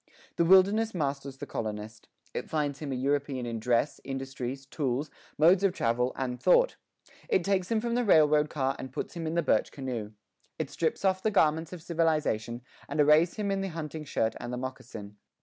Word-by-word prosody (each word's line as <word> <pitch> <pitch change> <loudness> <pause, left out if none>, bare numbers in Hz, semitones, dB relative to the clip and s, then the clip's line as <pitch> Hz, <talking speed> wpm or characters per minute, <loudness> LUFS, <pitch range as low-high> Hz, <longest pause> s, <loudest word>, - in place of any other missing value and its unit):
The 170 - +3
wilderness 195 +4 +5
masters 140 -3 -2
the - - -6
colonist. 110 0 -5 0.3
It - - -4
finds 145 -3 -1
him 150 -3 -5
a - - -1
European 135 -1 -1
in 115 -1 -3
dress, 120 +5 0
industries, 135 0 -5
tools, 135 0 -2 0.3
modes 175 +5 +5
of 195 -2 +3
travel, 125 -2 0
and 125 -2 -3
thought. - - +4 0.5
It 420 -5 +2
takes 190 -2 0
him 225 - +2
from 235 +1 -2
the 245 +1 +2
railroad 150 -6 +5
car 135 -2 -1
and 130 - -7
puts - - -5
him 165 -2 -4
in 160 - -2
the 170 - +2
birch 110 -6 +2
canoe. 120 -6 -5 0.4
It - - -3
strips 165 +4 -1
off 190 0 +2
the 220 - +2
garments 160 -5 +2
of 175 -3 -8
civilization 155 -9 0 0.3
and - - -3
arrays 150 +3 +5
him 205 -2 -1
in 195 0 0
the 195 - -2
hunting 160 -3 -5
shirt 110 -6 0
and 120 0 -5
the 125 - -3
moccasin. 115 -5 -7
150 Hz, 195 wpm, -29 LUFS, 125-170 Hz, 0.5 s, wilderness